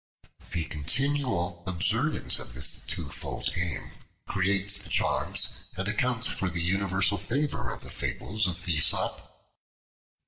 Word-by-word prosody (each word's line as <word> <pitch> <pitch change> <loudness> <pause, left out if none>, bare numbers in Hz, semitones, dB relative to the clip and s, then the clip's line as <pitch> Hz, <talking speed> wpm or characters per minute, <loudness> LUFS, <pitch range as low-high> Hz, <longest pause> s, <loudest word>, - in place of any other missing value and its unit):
The 85 -2 0
continual 95 - 0
observance 110 - +1
of - - -8
this 65 +1 +5
twofold - - -4
aim 85 -1 -2 0.3
creates 100 +1 0
the 100 -4 -8
charm, - - 0 0.4
and 95 +1 -1
accounts 120 +3 0
for 95 - -1
the 85 0 -1
universal 95 +1 +2
favor, 140 +9 -2
of - - -7
the - - -10
fables 105 -1 -1
of 90 0 -5
Aesop. 80 -3 0
95 Hz, 125 wpm, -28 LUFS, 85-110 Hz, 0.4 s, this